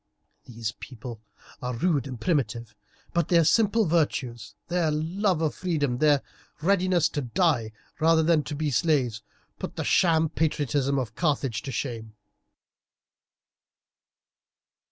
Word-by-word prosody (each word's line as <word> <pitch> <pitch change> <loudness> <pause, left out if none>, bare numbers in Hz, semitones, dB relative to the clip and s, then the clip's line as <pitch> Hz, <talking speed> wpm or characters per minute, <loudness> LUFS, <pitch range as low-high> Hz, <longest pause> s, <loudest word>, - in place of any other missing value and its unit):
These 115 -3 -4
people 120 -3 -9 0.4
are 125 -1 -3
rude 145 0 +1
and 125 -3 -7
primitive, 120 - -1 0.4
but 170 -2 +1
their 170 -2 +4
simple 220 +5 +3
virtues, 140 - -1
their 175 -2 +1
love 165 +3 0
of 155 - 0
freedom, 145 -9 -1
their 150 -2 +4 0.4
readiness 180 -1 +2
to 145 - -3
die 125 - +1 0.3
rather 160 0 +4
than 160 -1 +3
to 150 - -4
be 150 0 -1
slaves, 130 -8 +1 0.4
put - - -6
the - - -3
sham 160 -3 +3
patriotism 145 -3 0
of 120 -5 -2
Carthage 135 -6 0
to 135 - -6
shame." 115 -4 -5
150 Hz, 125 wpm, -26 LUFS, 125-170 Hz, 0.4 s, their